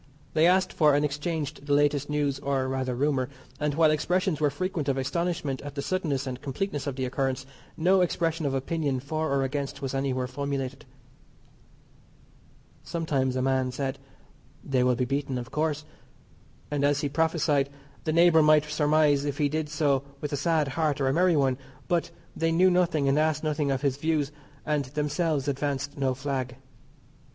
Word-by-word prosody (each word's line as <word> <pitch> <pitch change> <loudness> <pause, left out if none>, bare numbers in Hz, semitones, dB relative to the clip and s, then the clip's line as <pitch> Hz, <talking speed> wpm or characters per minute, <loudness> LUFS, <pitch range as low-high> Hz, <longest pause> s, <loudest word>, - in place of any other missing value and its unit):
They 160 +2 +5
asked 185 +1 +3
for 150 -3 +4
and 145 +1 +2
exchanged 150 0 -3
the 145 - +2
latest 145 0 +2
news, 145 -2 0
or, 135 -2 -1
rather, 130 -1 -2
rumour, 130 -1 0 0.3
and 150 -1 0
while 160 -1 +5
expressions 175 +1 0
were 150 - +4
frequent 160 -1 -2
of 135 - +1
astonishment 145 0 -2
at 145 0 -8
the 140 - -3
suddenness 155 -7 -1
and 130 -1 -5
completeness 145 +1 -3
of 140 - -2
the 130 -1 -2
occurrence, 130 0 -1 0.3
no 185 +3 +4
expression 165 -3 0
of 135 - -1
opinion 140 0 -1
for 155 +4 -2
or 140 -1 +2
against 140 +1 -3
was 135 -1 -4
anywhere 135 -2 -1
formulated. 135 +1 -4 2.0
Sometimes 140 -6 -1
a 130 - 0
man 130 -1 +1
said, 135 +1 -3 0.6
"They 130 -3 +1
will 125 0 +3
be 125 +1 0
beaten 135 0 -2
of 120 0 -6
course," 150 -1 -1 0.9
and, 145 -1 0
as 145 +1 +2
he 145 - 0
prophesied, 150 -2 +1 0.3
the 155 - 0
neighbour 170 0 +6
might 150 0 +5
surmise 150 -1 +3
if 145 -1 -2
he 145 -2 +2
did 155 0 -2
so 145 -3 +1 0.2
with 150 0 -4
a - - +2
sad 150 0 +1
heart 150 0 0
or 135 -1 +2
a - - +1
merry 175 +1 +3
one, 135 -2 +2 0.3
but 170 -2 +1 0.3
they 165 0 +1
knew 180 +3 +5
nothing 170 -5 +2
and 135 +2 +3
asked 155 -1 +1
nothing 150 -2 0
of 135 +1 -1
his 135 -2 +1
views, 150 -1 0 0.3
and 150 -2 0
themselves 150 +1 -1
advanced 140 0 -2
no 135 -2 0
flag. 130 -2 -3
145 Hz, 180 wpm, -27 LUFS, 135-155 Hz, 2.0 s, neighbour